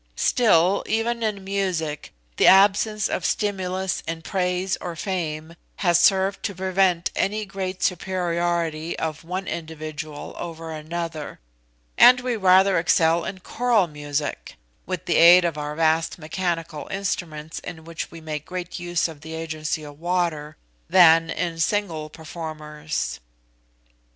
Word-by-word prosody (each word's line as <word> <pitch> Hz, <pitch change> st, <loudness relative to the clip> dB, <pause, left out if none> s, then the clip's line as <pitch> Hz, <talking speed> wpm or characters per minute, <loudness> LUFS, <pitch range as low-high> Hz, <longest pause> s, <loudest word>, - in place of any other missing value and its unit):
Still, 200 Hz, -5 st, +3 dB
even 230 Hz, +2 st, 0 dB
in 210 Hz, -3 st, -2 dB
music 185 Hz, -6 st, -2 dB, 0.3 s
the -, -, +5 dB
absence 205 Hz, +2 st, +5 dB
of -, -, -3 dB
stimulus 190 Hz, -2 st, -1 dB
in 165 Hz, 0 st, -4 dB
praise 180 Hz, 0 st, -1 dB
or 175 Hz, -2 st, -5 dB
fame 165 Hz, -3 st, -4 dB, 0.2 s
has 175 Hz, -3 st, +3 dB
served 195 Hz, 0 st, +3 dB
to 200 Hz, -, -3 dB
prevent 185 Hz, -1 st, +1 dB
any 210 Hz, +2 st, 0 dB
great 190 Hz, -1 st, -5 dB
superiority 170 Hz, -3 st, -1 dB
of 160 Hz, -1 st, -4 dB
one 185 Hz, +3 st, -4 dB
individual 155 Hz, -2 st, -6 dB
over 165 Hz, -1 st, -6 dB
another; 160 Hz, 0 st, -5 dB, 0.6 s
and 250 Hz, 0 st, +9 dB
we 250 Hz, -1 st, -1 dB
rather 190 Hz, -2 st, +5 dB
excel 165 Hz, 0 st, +3 dB
in 190 Hz, -1 st, -6 dB
choral 235 Hz, -1 st, +2 dB
music, 145 Hz, -2 st, -4 dB, 0.3 s
with 185 Hz, -1 st, -4 dB
the 175 Hz, -, +1 dB
aid 175 Hz, +1 st, +8 dB
of 170 Hz, -3 st, -1 dB
our 150 Hz, 0 st, -4 dB
vast 160 Hz, +1 st, +1 dB
mechanical 165 Hz, -1 st, -3 dB
instruments, 165 Hz, -5 st, -4 dB
in 160 Hz, -3 st, -9 dB
which 165 Hz, 0 st, -6 dB
we 165 Hz, -, -10 dB
make 155 Hz, -2 st, -5 dB
great 180 Hz, +1 st, -6 dB
use 175 Hz, 0 st, 0 dB
of 160 Hz, -3 st, -11 dB
the 160 Hz, +1 st, -7 dB
agency 155 Hz, -1 st, -3 dB
of 145 Hz, 0 st, -11 dB
water,* 165 Hz, -4 st, -1 dB, 0.3 s
than 165 Hz, -2 st, +6 dB
in 170 Hz, -2 st, -3 dB
single 165 Hz, -5 st, -1 dB
performers." 155 Hz, -1 st, -5 dB
170 Hz, 135 wpm, -23 LUFS, 160-190 Hz, 0.6 s, and